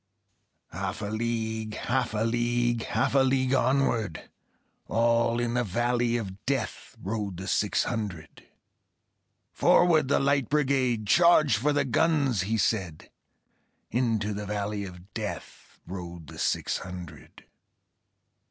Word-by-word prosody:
Half - - -4
a 105 +1 -3
league, 110 -1 -2
half 125 -1 -1
a 105 - +1
league, 120 0 0
Half 110 - 0
a 140 - +5
league 130 0 +2
onward, 120 - 0 0.6
All 115 +1 +2
in 120 -1 -1
the 125 0 +1
valley 120 +3 0
of 100 -4 -7
Death 135 -4 -3
Rode 100 -2 -4
the 95 +2 -6
six 105 +1 +1
hundred. 100 -9 -5 1.0
"Forward, 160 -5 +4
the 140 - +3
Light 140 -2 +1
Brigade! 130 -6 +1
Charge 155 - +5
for 135 +8 +1
the 145 -1 +1
guns!" 140 - +2
he 110 +4 -1
said; 95 -6 -1 0.8
Into 110 -4 0
the 105 0 -5
valley 105 0 -3
of 90 +1 -12
Death 110 -2 -7
Rode 85 -2 -7
the - - -11
six - - 0
hundred. 90 -4 -10
115 Hz, 125 wpm, -27 LUFS, 100-130 Hz, 1.0 s, a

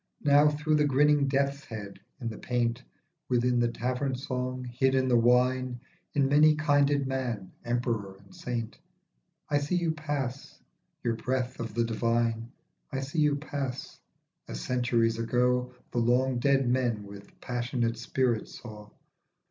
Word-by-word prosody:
Now 145 0 +6
through 150 +1 +1
the 150 - +3
grinning 145 +1 +4
death's 140 +1 0
head 105 -3 -8 0.2
in 120 - -4
the 110 - -5
paint, 120 0 -1 0.5
Within 125 0 +2
the 120 - +3
tavern 125 +3 -2
song, 130 -1 -3
hid 130 +2 +1
in 130 0 +2
the 125 - +3
wine, 125 +1 +3 0.4
In 140 -2 +3
many 150 +2 +5
kinded 145 -2 +2
man, 125 -7 -3
emperor 120 -5 -2
and 100 0 -19
saint, 115 -3 -4 0.7
I 145 - +2
see 145 +5 -1
you 170 -2 +1
pass, 145 -4 -4 0.5
you;.breath 125 +2 -1
of 115 -2 -5
the 120 - +2
divine. 115 0 0 0.4
I 135 - -2
see 145 +4 -3
you 150 -1 +4
pass, 140 -3 -5 0.5
as - - -5
centuries 115 - +1
ago 125 +2 +1 0.2
The 120 - 0
long 125 +2 +2
dead 135 0 +3
men 120 -4 +1
with 100 0 -13
passionate 120 -2 -2
spirit 120 -2 0
saw. 105 -2 -10
125 Hz, 145 wpm, -29 LUFS, 115-140 Hz, 0.7 s, Now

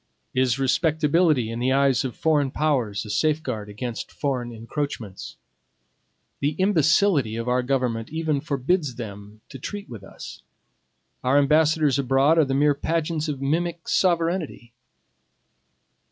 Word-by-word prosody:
Is 130 -1 +2
respectability 150 -2 +2
in 115 - -4
the 125 +2 +1
eyes 135 -1 +3
of 130 -3 -4
foreign 150 -4 +1
powers 125 -9 -1
a - - -9
safeguard 125 -3 -1
against 115 +3 -6
foreign 125 -4 -3
encroachments? 115 -3 -5 1.0
The 145 +2 0
imbecility 165 - +3
of 115 +1 -4
our 125 +1 +2
government 125 -3 -1
even 155 -2 -1
forbids 140 0 -1
them 105 -2 -9
to 135 - -9
treat 205 +9 -6
with 115 -7 -10
us. - - -10 0.8
Our 130 +2 +3
ambassadors 150 -1 +3
abroad 135 +4 +3
are 155 - +5
the 135 0 -1
mere 145 +1 +4
pageants 160 +2 -2
of 140 -3 -4
mimic 170 +4 -1
sovereignty. 170 -8 0
140 Hz, 130 wpm, -24 LUFS, 120-155 Hz, 1.0 s, are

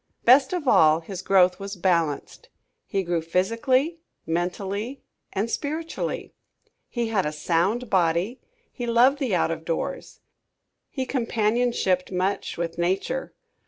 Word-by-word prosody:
Best 260 +2 +6
of 350 -6 -3
all 160 -7 +5
his 185 +2 -7
growth 185 -1 +4
was 200 +1 -6
balanced. 170 -5 -1 0.4
He 195 -1 -1
grew 170 -1 -1
physically, 230 - +1 0.3
mentally 195 +9 -3 0.3
and 205 +3 -1
spiritually. 315 +6 -4 0.6
He 235 -2 -2
had 205 -4 +1
a 150 - -2
sound 175 +10 0
body. 185 +4 +1 0.3
He 245 -2 -5
loved 250 +4 +4
the 250 -9 0
out 165 - +1
of 160 -1 -4
doors. 165 0 -4 0.7
He 265 -2 -3
companionshiped 230 -6 0
much 185 +2 -1
with 170 0 -4
nature. 190 +9 -1
195 Hz, 125 wpm, -25 LUFS, 175-245 Hz, 0.7 s, Best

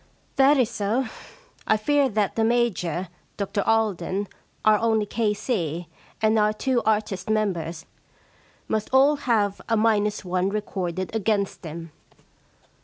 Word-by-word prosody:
* - - -38
That 275 +2 +6
is 245 -3 +2
so. 225 +5 0 0.6
I 215 - +4
fear 280 +5 +2
that 210 -3 0
the 225 - +1
Major, 205 -7 0 0.3
Dr 200 0 -1
Alden, 205 -3 0 0.4
our 215 -1 +5
only 220 -2 +2
K.C., 205 - -1 0.4
and 220 0 +4
our 210 0 +3
two 250 +2 0
artist 210 -3 0
members 175 -7 -1 0.8
must 215 -1 -1
all 275 +3 +5
have 205 -4 +1
a 225 - +3
minus 210 -2 +1
one 185 +1 0
recorded 190 -2 -3
against 210 -2 0
them. 165 0 -8
210 Hz, 130 wpm, -24 LUFS, 190-225 Hz, 0.8 s, That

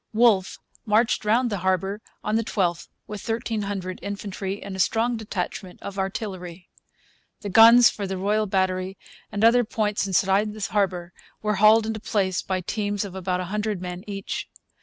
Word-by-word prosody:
Wolfe 215 -4 +3 0.3
marched 220 +1 +2
round 235 +3 +2
the 200 - -2
harbour 190 +3 0 0.2
on 210 - 0
the 225 - +2
12th 180 -6 -1 0.2
with 210 -2 -7
1,300 205 -5 -3
infantry 200 -1 -5
and 195 -1 -6
a - - -7
strong 230 +5 +2
detachment 200 -3 -5
of 200 0 -6
artillery. 190 -3 -5 0.7
The 205 - -4
guns 230 +4 +8
for 200 -2 -5
the 190 0 -3
Royal 210 +3 +1
Battery 190 0 -1 0.3
and 205 +1 -2
other 245 +2 +6
points 210 -2 -1
inside 195 +2 +2
the 210 -4 -4
harbour 180 -4 0 0.3
were 210 -1 0
hauled 215 +1 +6
into 220 0 -3
place 195 -4 0
by 185 -1 -2
teams 205 +1 -2
of 195 - -8
about 185 -1 -2
a - - -4
hundred 210 -2 -1
men 180 0 -6
each. 195 -1 -5
200 Hz, 165 wpm, -24 LUFS, 190-215 Hz, 0.7 s, guns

